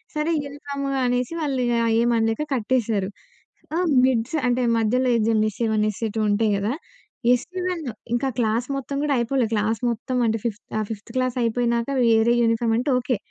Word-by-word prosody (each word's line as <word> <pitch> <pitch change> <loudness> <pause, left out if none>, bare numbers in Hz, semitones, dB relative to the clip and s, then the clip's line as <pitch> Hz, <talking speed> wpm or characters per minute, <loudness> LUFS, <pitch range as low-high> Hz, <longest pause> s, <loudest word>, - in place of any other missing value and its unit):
సరే 305 +2 0
యెల్దాము 280 0 -5 0.2
అనేసి 245 +4 0
వాళ్ళు 275 -4 -1
ఇగ 240 - +1 0.3
ఏం 235 - +3
అనలేక 225 +3 0
కట్టేసారు. 220 -4 0 0.7
ఆ - - +1 0.3
మిడ్స్ 255 +2 0
అంటే 245 +1 +1 0.2
మధ్యలో 250 +3 +2
ఇదేంటి 220 -1 +2
ఎస్ఎ-1, 220 0 0
ఎస్ఎ-2 220 +1 -4
ఉంటాయి 210 +1 +2
గదా! 205 +4 -1 0.6
ఎస్ఎ-1, 360 +5 -2 0.3
ఇంక 240 - 0
ఆ - - -16
క్లాస్ 230 +1 +1
మొత్తం 275 +1 -5
గూడా 295 -2 +1
అయిపోలే, 240 +1 +1
క్లాస్ 215 +1 0
మొత్తం 240 +3 -3
అంటే 225 0 +1
ఫిఫ్త్ 225 -2 -3 0.2
ఆ - - +1
ఫిఫ్త్ 210 -1 -8
క్లాస్ 255 -1 0
అయిపోయినాక 235 +1 0 0.2
వేరే 225 +1 +4
యూనిఫార్మ్ 230 0 +2
అంటే 265 +3 0
ఓకే. 250 -1 -1
235 Hz, 160 wpm, -23 LUFS, 225-260 Hz, 0.7 s, వేరే